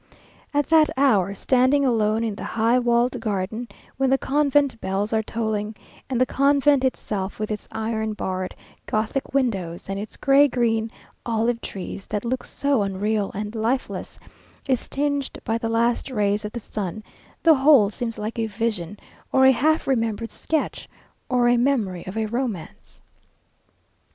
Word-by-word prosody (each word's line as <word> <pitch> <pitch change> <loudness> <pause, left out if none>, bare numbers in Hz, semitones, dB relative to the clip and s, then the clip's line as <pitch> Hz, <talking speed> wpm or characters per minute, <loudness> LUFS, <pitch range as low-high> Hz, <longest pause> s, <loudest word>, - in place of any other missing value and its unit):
At 290 -1 +1
that 320 -1 +6
hour, 205 -8 +3
standing 260 +6 +3
alone 220 -2 +2
in 225 -2 -1
the - - -8
high 230 +2 +2
walled 240 +1 +2
garden 220 +2 -3 0.3
when 270 0 +2
the 270 - +4
convent 280 -2 +1
bells 200 +3 -1
are 220 - +3
tolling, 220 -1 -3 0.3
and 255 -3 0
the 255 - +4
convent 280 +1 +3
itself, 205 -6 -2
with 215 0 -2
its 210 - -5
iron 220 -1 -2
barred, 185 -2 -3 0.3
Gothic 220 +6 -2
windows, 195 -11 -1
and 195 0 -2
its 210 - -7
gray 275 +1 +5
green 230 -3 0 0.3
olive 230 +1 0
trees 195 +1 -7
that 210 +2 -3
look 255 +2 -1
so 280 -5 0
unreal 200 +1 -1
and 210 +1 -4
lifeless, 235 +4 -2 0.5
is 260 -3 0
tinged 285 -1 -1
by 225 -1 0
the 225 - -2
last 235 +3 +1
rays 210 -3 0
of 210 - -5
the 240 - -4
sun, 210 -1 -5 0.4
the 330 - +7
whole 265 -7 +5
seems 230 +1 -4
like 215 +2 -4
a 225 - 0
vision, 210 -4 -3 0.3
or 265 0 +5
a 265 - +8
half 310 +6 +2
remembered 230 -3 -1
sketch, 315 -2 -2 0.4
or 250 -2 +3
a 240 0 +4
memory 235 -9 0
of 190 +4 -5 0.2
romance. 235 -9 -4
230 Hz, 155 wpm, -23 LUFS, 210-265 Hz, 0.5 s, a